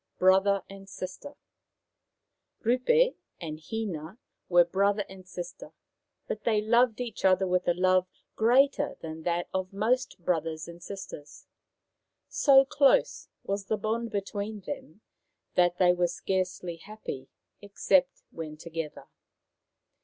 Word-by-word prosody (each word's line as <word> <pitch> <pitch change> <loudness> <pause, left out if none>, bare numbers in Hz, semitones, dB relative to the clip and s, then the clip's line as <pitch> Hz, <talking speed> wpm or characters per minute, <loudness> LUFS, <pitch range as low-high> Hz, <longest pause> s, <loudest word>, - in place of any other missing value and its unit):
BROTHER 190 +1 +4
AND 195 0 -12
SISTER 190 +9 -7 1.3
Rupe 470 - +3 0.3
and 155 -3 -6
Hina 180 0 -5 0.3
were 175 -1 +6
brother 200 +3 +1
and 190 -1 -13
sister, 175 -1 -8 0.5
but 210 - -4
they 220 -2 +2
loved 235 +2 +3
each 245 -2 -5
other 190 0 +4
with 180 -1 0
a 175 - +3
love 185 0 +3 0.3
greater 275 +5 +3
than 160 0 -7
that 175 +1 -1
of 185 0 -2
most 225 +6 0
brothers 160 -2 -1
and 170 0 -11
sisters. 165 -6 -9 0.8
So 275 - +6
close 280 - +2
was 200 0 -3
the 215 - 0
bond 225 +3 -2
between 205 +1 -4
them 195 - -8 0.5
that 175 0 +3
they 180 -1 +5
were 175 0 +1
scarcely 180 -1 -2
happy 165 -9 -8 0.3
except 195 -2 +1
when 155 -2 -7
together. 165 -1 -6
190 Hz, 125 wpm, -28 LUFS, 175-220 Hz, 1.3 s, were